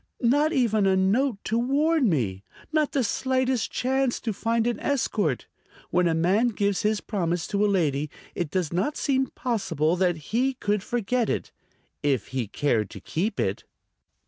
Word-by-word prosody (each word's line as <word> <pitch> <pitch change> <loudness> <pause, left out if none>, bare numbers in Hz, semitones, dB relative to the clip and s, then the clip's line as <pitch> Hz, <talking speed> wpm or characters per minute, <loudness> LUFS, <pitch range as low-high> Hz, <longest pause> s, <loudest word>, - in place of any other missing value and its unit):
Not 290 +6 +3
even 220 -9 +2
a 190 - +4
note 205 +6 +2
to 225 +2 0
warn 280 +2 +2
me! 105 - -1 0.3
Not 310 -2 +2
the 270 - +2
slightest 260 +2 0
chance 265 0 0
to 225 - -2
find 230 +3 0
an 240 -2 0
escort! 210 - 0 0.5
When 180 0 +3
a 165 - +1
man 190 +9 +3
gives 200 -4 0
his 215 -1 +1
promise 175 -5 -1
to 200 0 +1
a - - +4
lady 150 -6 +1 0.2
it 175 -4 -2
does 175 -1 -1
not 205 - 0
seem 265 -2 +1
possible 195 - -1
that 180 -1 +2
he 245 - -1
could 210 -5 0
forget 240 +2 -1
it... - - -2 0.5
if 140 -7 0
he 130 -4 -2
cared 110 -2 0
to - - -9
keep 195 +8 -2
it." - - -1
210 Hz, 170 wpm, -26 LUFS, 170-255 Hz, 0.5 s, a